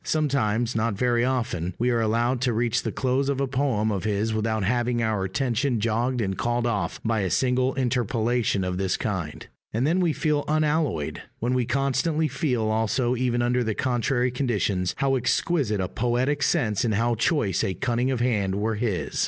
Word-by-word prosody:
Sometimes, 120 -7 0
not 115 -1 0
very 120 +2 +1
often, 120 -9 -1
we 125 +2 +1
are 120 -1 +1
allowed 120 +3 +1
to 125 -2 +1
reach 115 0 +1
the - - -3
close 135 +1 0
of 140 -1 -1
a 140 - +1
poem 125 -5 0
of 100 -3 -2
his 110 +1 0
without 110 -1 -1
having 120 +3 0
our 110 -3 0
attention 125 +4 0
jogged 120 +3 0
and 95 -2 -1
called 120 +2 -1
off 110 -4 -1
by 110 -1 +1
a 95 -2 0
single 130 +4 +1
interpolation 120 -4 0
of 90 0 -2
this 95 -1 0
kind; 90 -8 -4 0.3
and 115 +4 0
then 170 +5 +2
we 175 -3 +2
feel 150 -2 0
unalloyed 150 - 0 0.2
what 120 +2 -1
we 125 -1 +1
constantly 140 +4 +1
feel 135 -4 -1
also 115 +3 +1
even 120 -1 0
under 125 +1 +1
the 110 -2 -2
contrary 125 0 0
conditions 105 -8 -1
how 135 -1 +1
exquisite 130 - 0
a 95 - 0
poetic 125 +7 0
sense 110 -4 +1
and 110 -4 +1
how 120 +3 +1
choice 115 - +1
a 95 - -1
cunning 120 +4 0
of 130 -3 -1
hand 105 -6 +1
were 105 +2 -1
his. 100 - -2
120 Hz, 185 wpm, -25 LUFS, 110-130 Hz, 0.3 s, then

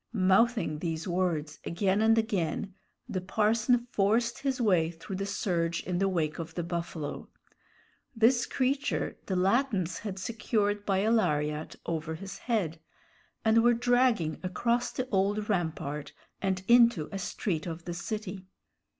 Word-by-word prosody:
Mouthing 195 -3 +3
these 165 0 -3
words 175 -4 -1
again 190 +3 +1
and 225 +1 +5
again, 200 -3 -1 0.3
the 185 - -3
parson 220 +5 +2
forced 225 +4 +1
his 270 -2 -1
way 180 -8 +3
through 175 +3 -7
the 195 +1 -3
surge 170 -4 -1
in 180 -1 -2
the 195 0 +2
wake 160 -4 -1
of 165 0 -6
the 175 - -2
buffalo. 170 -3 -4 0.9
This 235 +2 +4
creature 270 +2 -1
the 190 - -1
Latins 190 -2 +1
had 200 -3 -5
secured 205 0 -1
by 195 -1 +2
a 220 +2 +2
lariat 150 -8 0
over 160 -1 -3
his 195 +4 -8
head, 185 -10 -1 0.7
and 220 +1 +5
were 240 +1 +5
dragging 245 -9 +2
across 235 +6 0
the 255 - -3
old 205 +1 +1
rampart 160 -6 -2 0.3
and 190 -1 -1
into 235 -10 +5
a 195 - -4
street 180 -3 -2
of 165 0 -6
the 175 - -4
city. 190 +1 -5
195 Hz, 145 wpm, -29 LUFS, 170-225 Hz, 0.9 s, and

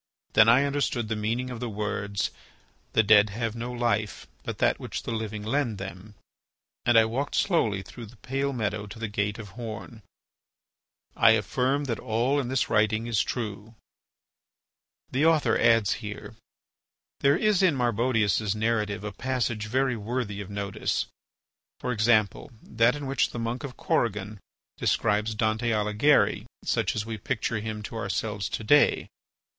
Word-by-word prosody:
Then 110 +1 +7
I 125 +4 +6
understood 140 -5 -1
the 110 - 0
meaning 115 +4 -2
of 120 - -6
the 120 -1 -3
words, 100 -1 -2 0.6
"The 110 - +4
dead 105 0 +6
have 115 +2 -3
no 120 +1 -4
life, 115 -3 -1 0.2
but - - -5
that - - +2
which - - -5
the - - -4
living 110 -2 -4
lend 120 -1 0
them," 95 +2 -8 0.7
and 120 -1 +6
I 110 - +7
walked 130 +6 -2
slowly 110 - +1
through 115 +4 -10
the 115 - -16
pale 135 +4 -2
meadow 105 -4 -2
to 105 - -10
the 115 0 -3
gate 105 0 -2
of 110 -3 -8
horn. 115 +1 -8 1.1
I 110 - +6
affirm 130 +7 0
that 120 -5 -3
all 120 +6 +1
in 135 - -2
this 130 0 0
writing 110 0 +2
is 115 -3 +1
true. 110 -1 -5 1.4
There 155 +5 +4
is 115 -7 +3 1.7
in 180 -6 +4
Marbodius's 115 -4 +1
narrative 105 -3 -1
a 105 - -4
passage 120 -2 -2
very 130 +2 +1
worthy 110 -2 -3
of 100 - -8
notice, 100 -1 -2 0.7
viz., 115 -3 -1
that 115 +2 +1
in 145 -1 -6
which 135 0 +1
the - - -7
monk 115 +3 -3
of 135 -3 -7
Corrigan 105 -2 -1 0.4
describes 105 0 +1
Dante 110 +2 0
Alighieri 105 +7 +2 0.2
such - - 0
as 105 -1 -2
we 110 -1 -5
picture 110 -1 -2
him 110 0 -5
to 110 - -7
ourselves 105 -3 -2
to 110 - -4
day. 145 +7 +4
110 Hz, 150 wpm, -27 LUFS, 105-125 Hz, 1.7 s, Then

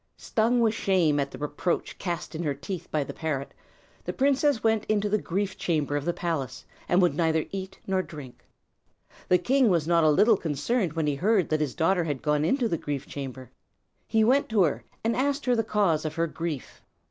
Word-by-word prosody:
Stung 235 +2 +1
with 225 -2 +3
shame 175 -9 +2
at 140 -1 -1
the - - -9
reproach 150 +4 -2
cast 175 -3 -4
in 160 - -4
her 145 -4 -1
teeth 170 +6 -6
by 150 -2 0
the - - -7
parrot, 150 -4 -3 0.5
the - - -3
princess 280 -2 +2
went 220 -1 +2
into 210 -1 +1
the 210 0 0
grief 195 +3 -2
chamber 150 -4 0
of 145 0 -2
the 175 - +2
palace, 165 -6 -3 0.2
and 180 +1 +4
would 175 - +3
neither 160 -2 +1
eat 195 0 -6
nor 190 -1 +1
drink. 150 -7 -11 0.9
The 180 - +6
king 255 +6 +3
was 165 -4 +1
not 170 -1 +4
a 155 - +5
little 210 +8 +5
concerned 170 - -1
when 160 -1 -1
he 150 - +1
heard 190 +5 +2
that 155 0 +1
his 145 -4 -2
daughter 175 +2 +2
had 145 -5 -3
gone 150 0 +1
into 245 - +2
the 165 -7 -1
grief 145 -2 -4
chamber. 130 -3 -7 0.6
He 220 -1 +3
went 265 +5 +3
to 215 -4 +4
her, 135 -8 0 0.2
and 230 +1 +1
asked 280 +3 0
her 250 -1 +3
the 225 - +1
cause 200 -8 +1
of 155 0 -4
her 165 - +1
grief. 165 -3 -5
170 Hz, 210 wpm, -27 LUFS, 150-215 Hz, 0.9 s, The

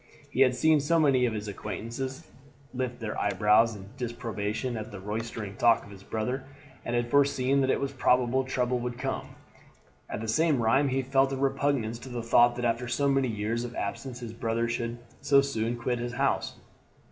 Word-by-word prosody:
He 130 - 0
had 130 -2 +5
seen 155 +3 +4 0.2
many 135 -5 +4
of 115 - -2
his 105 -1 -4
acquaintances 115 - -5 0.5
lift 125 -1 -3
their 110 -3 -4
eyebrows 105 +3 +3
in 95 -1 -10
disapprobation 120 -1 -3
at 110 -1 -6
the 100 - -7
roystering 105 0 -5
talk 115 -1 +4
of 100 - -13
his 100 -1 -12
brother, 115 +6 -3 0.4
and 120 - -2
had 120 0 -1
foreseen 140 -1 +3
that 135 - +1
it - - +2
was 140 -1 -2
probable 125 0 +2
trouble 125 -1 0
would 120 0 -4
come. 135 +1 -4 0.7
At - - -4
the 115 - -4
same 150 +4 +2
rime 120 +5 +3
he 135 0 0
felt 135 +1 +2
a - - -2
repugnance 135 -4 0
to 130 - -10
the 120 -2 -4
thought 120 +1 +5
that 125 0 -2
after 120 +1 0
so 130 +4 +1
many 135 -1 +2
years 110 +1 -2
of 120 0 -6
absence 125 +5 -4
his 115 -2 -6
brother 115 0 -1
should 115 0 -3 0.2
so 140 -1 +5
soon 120 -4 -1
quit 120 +1 -1
his 120 0 -4
house. 135 +2 0
120 Hz, 195 wpm, -28 LUFS, 115-130 Hz, 0.7 s, had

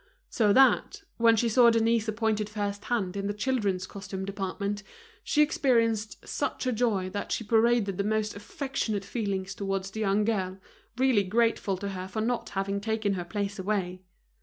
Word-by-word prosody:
So 215 -3 +3
that, 265 +5 +4
when 230 -1 +5
she 235 +2 +1
saw 235 +1 +6
Denise 230 -1 +2
appointed 215 -1 0
first 205 -1 -3
hand 200 -7 -1
in 200 0 -2
the 205 - -2
children's 210 -6 0
costume 190 -1 -6
department, 200 +1 -3 0.4
she 300 -1 +3
experienced 230 -7 +1
such - - -2
joy 210 -5 0
that 205 - -4
she - - -1
paraded 225 -3 +2
the - - +2
most 215 0 -1
affectionate 215 -2 -3
feeling 200 -4 -2
towards 195 0 -3
the 220 - -6
young 205 0 +2
girl, 190 -4 -1 0.4
really 260 -5 +4
grateful 210 -1 +1
to 200 +2 -4
her 185 -1 -5
for 205 +3 -4
not 235 +2 -1
having 200 +1 -1
taken 220 -1 0
her 180 -2 -3
place 200 +2 -3
away. 185 -2 -2
210 Hz, 165 wpm, -28 LUFS, 195-230 Hz, 0.4 s, saw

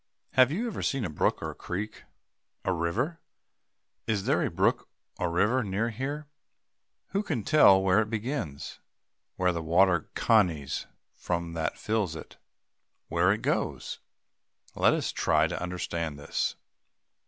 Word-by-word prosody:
Have 130 0 +5
you 210 +10 -1
ever 230 -5 -4
seen 135 -5 0
a 80 - -4
brook 75 - 0
or - - -3
creek? 105 +4 -5 0.6
A 95 - +2
river? 110 - -1 0.9
Is 105 -3 0
there - - +2
a - - 0
brook - - +1 0.3
or 90 - 0
river 105 +9 +2
near 105 +4 -1
here? 140 +6 -4 0.8
Who 195 - 0
can 145 - -2
tell 145 -11 +7
where 95 +2 +4
it 105 - -3
begins? 110 - -4 0.6
where 90 0 +2
the 85 -1 -3
water 85 +1 +3
conies 85 - +2 0.3
from 85 -1 -3
that 80 -1 -2
fills 105 -7 -1
it? - - -10 0.7
where - - +3
it - - -1
goes? - - -1 0.7
Let - - +4
us - - -1
try 80 0 +2
to 80 - -3
understand 85 -4 -3
this. 70 - -2
95 Hz, 140 wpm, -28 LUFS, 85-120 Hz, 0.9 s, tell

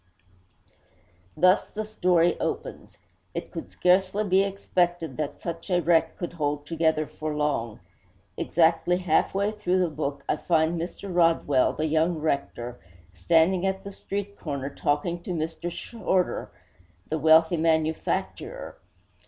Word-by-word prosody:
Thus 185 +4 +4
the 215 0 -5
story 180 -5 +2
opens. - - -4 0.4
It - - -5
could - - -7
scarcely 190 +3 +2
be 190 -1 +3
expected 175 -6 -1
that 150 -1 -3
such 170 0 -5
a 180 -1 +3
wreck 165 -1 +2
could 175 -1 -5
hold 145 -3 -2
together 160 -1 +1
for 155 0 -5
long. 140 -7 -1 0.6
Exactly 165 +1 +2
half 180 0 +1
way 200 +2 +1
through 210 -4 0
the 180 -2 +2
book 140 -2 -4
I - - +1
find 165 +1 +1
Mr. 180 +2 -6
Rodwell, 165 -6 +3
the 155 - -2
young 160 +2 +1
rector, 125 -5 -3 0.3
standing 165 - +3
at 190 0 -2
the 200 - -7
street 200 +1 -5
corner 140 -3 -4
talking 150 +5 -1
to - - -10
Mr. 165 +2 -3
Shorder, 190 -3 -1 0.6
the 160 - -2
wealthy 160 +3 +5
manufacturer. 160 -1 -1
165 Hz, 135 wpm, -26 LUFS, 155-180 Hz, 0.6 s, wealthy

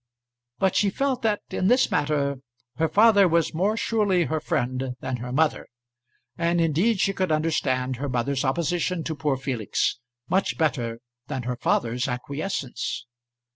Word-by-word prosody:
But 190 -1 +1
she 205 - +3
felt 265 +4 -1
that, 215 -3 0
in 185 - 0
this 250 +4 +4
matter, 145 -2 +1 0.4
her 160 0 +1
father 205 -2 +6
was 170 -1 +1
more 200 +7 +1
surely 205 -6 +2
her 155 +1 -1
friend 130 -4 -2
than 130 -1 -3
her 125 +1 -6
mother. 155 +3 +1 0.7
And 170 0 +2
indeed 170 +7 +2
she 195 - +2
could 185 -3 -1
understand 130 -5 0
her 140 +2 -3
mother's 130 +2 -1
opposition 170 +4 0
to 160 - -3
poor 145 -3 0
Felix, 125 -3 -1 0.3
much 190 +7 +1
better 120 -8 -1 0.3
than 130 -2 -3
her 125 +1 -2
father's 120 +1 0
acquiescence. 140 +2 -3
155 Hz, 150 wpm, -25 LUFS, 130-185 Hz, 0.7 s, father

